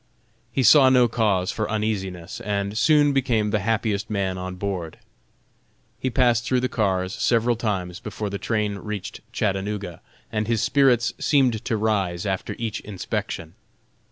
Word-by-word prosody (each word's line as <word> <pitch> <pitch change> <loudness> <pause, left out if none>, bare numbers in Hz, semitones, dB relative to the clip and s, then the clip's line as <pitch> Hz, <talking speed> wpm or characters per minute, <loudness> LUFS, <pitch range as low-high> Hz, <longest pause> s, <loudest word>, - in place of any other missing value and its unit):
He 135 - 0
saw 130 +3 +7
no 125 -2 +5
cause 105 -5 +1
for 110 -1 -3
uneasiness, 95 -5 -3
and 100 0 -2
soon 145 +3 +4
became 115 -6 +1
the 105 - +1
happiest 105 0 -1
man 100 -3 -1
on 90 0 -5
board. 90 -4 -4 1.0
He 130 - -1
passed 120 -2 +3
through 125 0 +1
the 130 - +1
cars 95 -6 0
several 120 0 +2
times 95 -5 -3
before 105 -1 -5
the 100 - -4
train 105 -3 -1
reached 105 -2 -6
Chattanooga, 100 -3 -2 0.3
and 110 -1 -1
his 115 -2 +1
spirits 125 -5 +3
seemed 130 -7 +2
to 115 - 0
rise 100 -5 0
after 95 -2 -2
each 110 -2 -3
inspection. 85 -4 -5
105 Hz, 150 wpm, -24 LUFS, 95-120 Hz, 1.0 s, saw